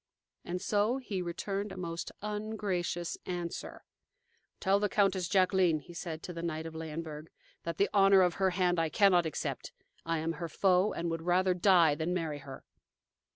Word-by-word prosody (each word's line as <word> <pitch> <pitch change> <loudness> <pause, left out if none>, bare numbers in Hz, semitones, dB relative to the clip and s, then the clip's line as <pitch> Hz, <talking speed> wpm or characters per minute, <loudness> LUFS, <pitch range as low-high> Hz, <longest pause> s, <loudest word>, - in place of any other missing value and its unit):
And 180 +1 -3
so 210 +6 +1
he 210 -8 -4
returned 195 +4 -3
a - - -8
most 170 -2 -4
ungracious 210 -5 -3
answer: 175 -2 -5 0.8
"Tell 195 +1 +3
the 205 0 0
Countess 190 -3 +2
Jacqueline," 185 -3 +3
he 175 +4 -12
said 165 -2 -6
to 180 - -6
the 165 - -5
knight 160 -1 -3
of 165 - -7
Leyenburg, 160 -1 -6 0.4
"that 165 -1 -3
the 200 - +3
honor 195 -1 +6
of 180 -1 +2
her 190 - +4
hand 180 -1 +1
I 165 -1 +1
cannot 180 -3 +4
accept. 155 - -4 0.3
I 165 0 -1
am 160 +1 -1
her 165 +1 -5
foe, 185 +4 +3
and 170 0 -3
would 165 0 -3
rather 180 +2 +2
die 175 -4 +5
than 160 +4 -2
marry 160 -4 -2
her." 135 -1 -10
175 Hz, 175 wpm, -31 LUFS, 165-195 Hz, 0.8 s, honor